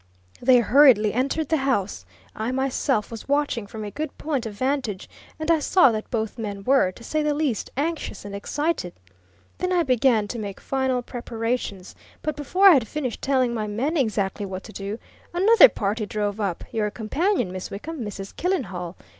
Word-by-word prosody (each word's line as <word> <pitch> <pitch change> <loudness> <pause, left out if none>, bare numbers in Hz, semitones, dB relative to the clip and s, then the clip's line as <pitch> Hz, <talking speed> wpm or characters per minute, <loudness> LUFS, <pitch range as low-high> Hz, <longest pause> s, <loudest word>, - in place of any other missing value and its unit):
They 250 0 +6
hurriedly 235 -4 +5
entered 275 +5 -1
the 320 - +3
house 205 - -1 0.3
I 220 +3 -2
myself 265 -3 0
was 225 -2 -8
watching 285 -7 0
from 215 +1 -7
a 205 - -5
good 305 +3 -5
point 275 -7 -2
of 210 - -8
vantage, 255 -5 -2 0.3
and 315 +1 0
I 325 - +4
saw 300 -2 +5
that 215 -1 -4
both 220 0 -3
men 200 -3 -5
were, 260 -6 +3
to 210 - -15
say 310 +5 -1
the 300 -1 +1
least, 285 -8 -1
anxious 300 -9 -3
and 200 - -7
excited. 290 - -2 0.7
Then 365 - -1
I 355 -2 +3
began 250 -5 +2
to 235 - -4
make 200 -2 -6
final 265 -2 -1
preparations. 230 -5 -4 0.3
But 305 -1 -2
before 365 +7 +3
I'd 265 - +5
finished 260 -1 -4
telling 260 -3 +1
my 215 -2 -2
men 250 +10 -1
exactly 210 - 0
what 190 0 -6
to - - -11
do, 200 +2 -5 0.4
another 455 +7 +7
party 210 +2 -2
drove 205 0 -2
up 195 -5 -2
your 215 -2 0
companion, 245 - -1
Miss 185 0 -6
Wickham, 285 +7 -6
Mrs. 200 -2 -7
Killenhall. 190 - -2
240 Hz, 180 wpm, -24 LUFS, 205-290 Hz, 0.7 s, another